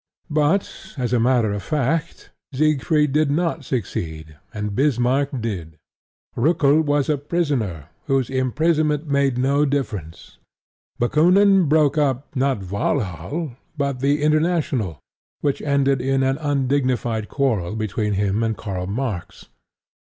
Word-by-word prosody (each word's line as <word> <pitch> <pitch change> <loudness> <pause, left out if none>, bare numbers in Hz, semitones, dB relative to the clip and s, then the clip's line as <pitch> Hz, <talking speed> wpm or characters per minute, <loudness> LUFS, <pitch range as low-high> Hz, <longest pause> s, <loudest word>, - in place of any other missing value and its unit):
But, 155 +5 0
as 125 -2 -1
a 120 - +3
matter 120 -2 +2
of 105 - -3
fact, 150 - -2 0.2
Siegfried 150 0 +2
did 150 -1 +2
not 165 0 0
succeed 80 - -4 0.2
and 105 -2 -4
Bismarck 135 +2 +1
did. 85 -8 -5 0.6
Roeckel 150 +2 +3
was 145 -2 +1
a 150 -2 +1
prisoner 135 - -2 0.2
whose 135 -3 +1
imprisonment 150 +4 +1
made 140 -3 +1
no 140 +3 +2
difference; 110 - -4 0.6
Bakoonin 180 +7 +4
broke 155 -1 +3
up, 140 0 -1
not 130 -9 -1
Walhall, 130 - -2 0.3
but 140 -2 -1
the 140 +2 +1
International, 150 - +1 0.4
which 145 -2 0
ended 140 -2 +1
in 135 +1 +1
an 135 +2 0
undignified 130 -6 0
quarrel 110 -9 0
between 105 -1 -2
him 100 +2 0
and 110 -2 -1
Karl 95 -3 -4
Marx. 105 -5 -4
135 Hz, 125 wpm, -22 LUFS, 110-150 Hz, 0.6 s, Bakoonin